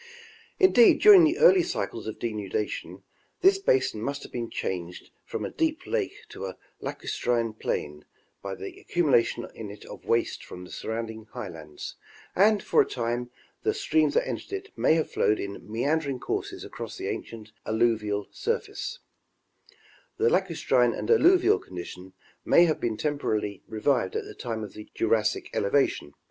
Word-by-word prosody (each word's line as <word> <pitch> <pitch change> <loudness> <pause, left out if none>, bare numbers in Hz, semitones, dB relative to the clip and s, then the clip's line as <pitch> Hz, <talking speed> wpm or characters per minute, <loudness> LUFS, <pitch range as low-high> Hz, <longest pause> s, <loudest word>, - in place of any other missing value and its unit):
Indeed, 310 - +6
during 395 -5 +9
the 315 +2 +2
early 390 -6 +7
cycles 335 - -3
of 110 - -5
denudation, 105 -2 -4 0.4
this 390 +1 +5
basin 130 - +1
must 140 +4 -3
have - - -11
been 120 -2 -4
changed 90 -1 -5
from - - -4
a - - -5
deep 320 -2 -1
lake 425 -4 -1
to - - -6
a - - -8 0.2
lacustrine 115 -2 -1
plain 75 -8 -4 0.4
by 100 -1 -5
the 95 - -8
accumulation 140 -9 +1
in 110 -2 -7
it 100 - -11
of - - -10
waste 115 0 0
from 90 - -9
the 90 - -12
surrounding 110 -1 -5
highlands, 80 -11 -8 0.4
and 205 +2 +4
for - - +4
a - - 0
time 120 0 -2 0.3
the 430 0 0
streams 400 -5 +2
that - - +2
entered - - -5
it 395 +1 -5
may 160 - +3
have 160 - -1
flowed 105 - +2
in 100 +1 -7
mean 140 +8 +1
dering 140 -4 -4
courses - - -3
across - - -7
the - - -4
ancient 110 -2 -6 0.2
alluvial 110 -2 +1
surface; 475 +2 -3 1.2
the 450 +3 +3
lacustrine - - +2
and - - -1
alluvial 380 -1 +5
condition 90 +1 -9 0.3
may 175 - +6
have 155 -2 0
been 115 -2 -1
temporarily 110 -9 -1
revived 110 -2 0
at - - -2
the - - -9
time 110 -2 -4
of 105 - -8
the 105 - -10
Jurassic 110 -1 +1
elevation. 100 - +1
120 Hz, 160 wpm, -27 LUFS, -, 1.2 s, during